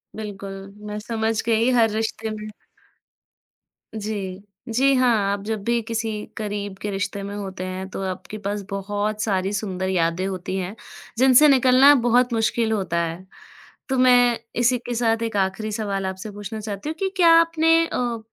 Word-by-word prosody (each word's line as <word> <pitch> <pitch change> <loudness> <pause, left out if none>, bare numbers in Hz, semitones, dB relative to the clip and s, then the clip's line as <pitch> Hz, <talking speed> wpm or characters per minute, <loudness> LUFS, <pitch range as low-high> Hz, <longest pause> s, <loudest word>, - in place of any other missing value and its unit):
बिल्कुल, 200 -2 -6 0.3
मैं 210 - -4
समझ 225 0 -1
गई 230 +1 +2
हर 235 -3 +4
रिश्ते 220 +1 -2
में 215 0 -6 1.5
जी। 200 -3 -5 0.3
जी 270 +4 +3
हाँ, 250 -2 +4 0.2
आप 200 0 -3
जब 215 -1 -3
भी 235 +2 +1
किसी 225 0 -3 0.3
करीब 205 -2 -4
के 210 - -3
रिश्ते 200 +1 -3
में 200 +1 -6
होते 190 -2 -6
हैं 185 +1 -5
तो 195 - -6
आपके 185 +3 -6
पास 205 0 -3
बहुत 205 +2 -2
सारी 195 -2 0
सुंदर 190 -2 -2
यादें 170 0 0
होती 185 0 -4
हैं, 190 +2 -4 0.4
जिनसे 260 +3 +7
निकलना 265 +1 +6
बहुत 245 +1 +3
मुश्किल 225 0 +1
होता 190 -5 -1
है। 170 +3 -5 0.6
तो 265 - 0
मैं 245 -2 +5 0.2
इसी 245 +1 +3
के 245 0 -6
साथ 225 -1 +1
एक 225 -2 -2
आखिरी 195 +3 -1
सवाल 200 -3 -2
आपसे 190 +3 -5
पूछना 205 +2 -7
चाहती 210 +5 -5
हूँ 315 - -4
कि 390 - 0
क्या 350 -3 +5
आपने 330 -1 +3
अ, 240 -6 -2
215 Hz, 165 wpm, -23 LUFS, 195-235 Hz, 1.5 s, जिनसे